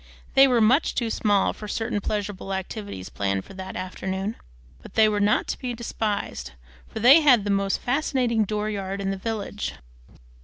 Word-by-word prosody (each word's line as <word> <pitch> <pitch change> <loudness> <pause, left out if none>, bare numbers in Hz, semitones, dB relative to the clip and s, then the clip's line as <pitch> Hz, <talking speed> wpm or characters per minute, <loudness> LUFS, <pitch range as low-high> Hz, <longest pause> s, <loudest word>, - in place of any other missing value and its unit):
They 270 0 +7
were 245 -3 +3
much 250 +8 +3
too 230 -2 -1
small 205 -3 +2
for 210 - -9
certain 220 0 -2
pleasurable 200 -2 -3
activities 190 - -6
planned 100 -1 -2
for - - -12
that 190 0 -7
afternoon; 190 +3 -4 0.5
but - - -14
they 220 -1 +6
were 210 -1 0
not 205 +1 +2
to - - -3
be 250 -2 -4
despised, 210 - -3 0.3
for - - -7
they 265 +8 +8
had 255 -8 +5
the 205 - -1
most 195 0 +1
fascinating 250 -4 +1
dooryard 205 -2 -3
in 195 0 -1
the - - -2
village. 205 0 -4
210 Hz, 170 wpm, -25 LUFS, 195-230 Hz, 0.5 s, they